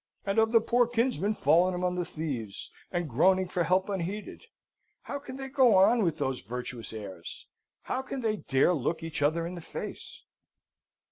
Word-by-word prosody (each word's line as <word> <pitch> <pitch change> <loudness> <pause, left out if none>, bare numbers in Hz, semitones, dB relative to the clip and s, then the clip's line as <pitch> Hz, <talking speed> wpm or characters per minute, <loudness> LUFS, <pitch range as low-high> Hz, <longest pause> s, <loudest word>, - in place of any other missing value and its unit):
and 195 +2 +1
of 225 0 +3
the 230 - +6
poor 240 +2 +2
kinsman 230 - 0
fallen 180 +1 +3
among 180 0 0
the 180 0 -1
thieves, 135 - -5 0.2
and 175 -2 -1
groaning 185 +9 +3
for 175 -1 0
help 185 +3 +2
unheeded? 200 - -4 0.6
How 285 - -5
can 270 -2 -9
they 270 0 -5
go 260 -5 +4
on 195 +5 +5
with 170 -4 0
those 135 -3 -2
virtuous 120 +3 -6
airs? 100 -6 -8 0.4
How 260 - -2
can 265 0 -5
they 220 -2 0
dare 135 +1 +2
look 160 +2 -1
each 160 -2 -4
other 160 +3 +2
in 175 - -5
the 175 - -7
face? - - -8
180 Hz, 180 wpm, -29 LUFS, 150-225 Hz, 0.6 s, the